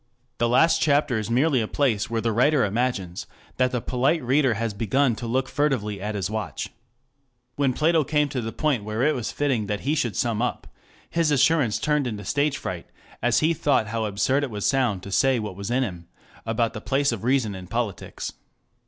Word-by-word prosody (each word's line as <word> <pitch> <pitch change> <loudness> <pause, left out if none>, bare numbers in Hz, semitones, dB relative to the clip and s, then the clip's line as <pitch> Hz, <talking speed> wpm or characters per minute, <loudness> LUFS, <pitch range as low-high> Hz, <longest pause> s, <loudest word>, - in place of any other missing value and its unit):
The 120 - +2
last 160 +6 +4
chapter 145 -5 +2
is 110 - -4
merely 130 +2 +3
a 110 - -2
place 115 -8 0
where 115 -1 -1
the 115 - 0
writer 130 +3 +3
imagines 100 -5 -2 0.3
that 130 0 +3
the 125 - -1
polite 130 +6 +1
reader 130 -1 +2
has 115 0 -2
begun 120 +4 +1
to 120 - -5
look 130 +3 0
furtively 115 -10 -1
at 105 +1 -3
his 95 -3 -1
watch. 105 -7 -4
2 - - -31 0.9
When 140 -3 +2
Plato 160 +3 +3
came 150 +1 +1
to 130 -2 -3
the 115 0 -4
point 140 -7 0
where 110 +3 -2
it 155 +2 +3
was 120 -5 -3
fitting 130 -8 0
that 105 0 -2
he 145 - 0
should 120 -8 -1
sum 115 -2 0
up, 125 - -2 0.4
his 165 -2 +1
assurance 145 -4 +3
turned 150 -3 0
into 105 -4 -5
stage 145 +4 +1
fright 85 -2 -5 0.3
as 120 0 +2
he 160 +2 +3
thought 140 -8 +1
how 115 0 -1
absurd 110 +8 +1
it 140 - -2
would 105 -3 -5
sound 120 -9 +1
to 100 - -8
say 130 +5 +3
what 105 -4 -4
was 100 +2 -6
in 130 +2 +2
him 90 -7 -6 0.4
about 115 0 0
the 110 - -6
place 140 +2 +1
of 115 -3 -5
reason 125 -4 +1
in 95 -1 -8
politics. 115 -3 -4
120 Hz, 210 wpm, -24 LUFS, 105-140 Hz, 0.9 s, last